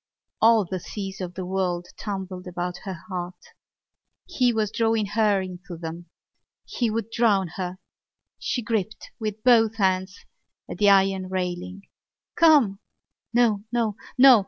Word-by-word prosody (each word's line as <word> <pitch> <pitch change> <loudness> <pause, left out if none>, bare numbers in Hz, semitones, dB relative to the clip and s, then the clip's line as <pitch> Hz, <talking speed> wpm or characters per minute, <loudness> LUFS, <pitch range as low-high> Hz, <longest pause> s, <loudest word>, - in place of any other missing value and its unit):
All 225 -2 +5
the 185 +1 -4
seas 195 +1 -6
of 180 -1 -5
the 185 - -4
world 180 -2 -1
tumbled 190 -3 -5
about 180 0 -4
her 190 -2 -4
heart. 180 -1 -5 0.9
He 250 -2 +2
was 215 -3 0
drawing 225 -2 +1
her 210 -1 +2
into 180 -1 -8
them: 165 +1 -7 0.6
he 240 -2 -1
would 225 0 -3
drown 205 -6 +2
her. 180 +1 -5 0.6
She 245 - -2
gripped 215 -2 -3
with 215 -1 -4
both 225 -3 +5
hands 190 -2 0 0.5
at - - -7
the 205 -1 +5
iron 195 -1 +3
railing. 185 +1 -4 0.5
"Come!" 290 - +5 0.5
No! 230 -4 +3
No! 230 -4 0 0.2
No! 255 -2 +9
195 Hz, 135 wpm, -25 LUFS, 185-225 Hz, 0.9 s, No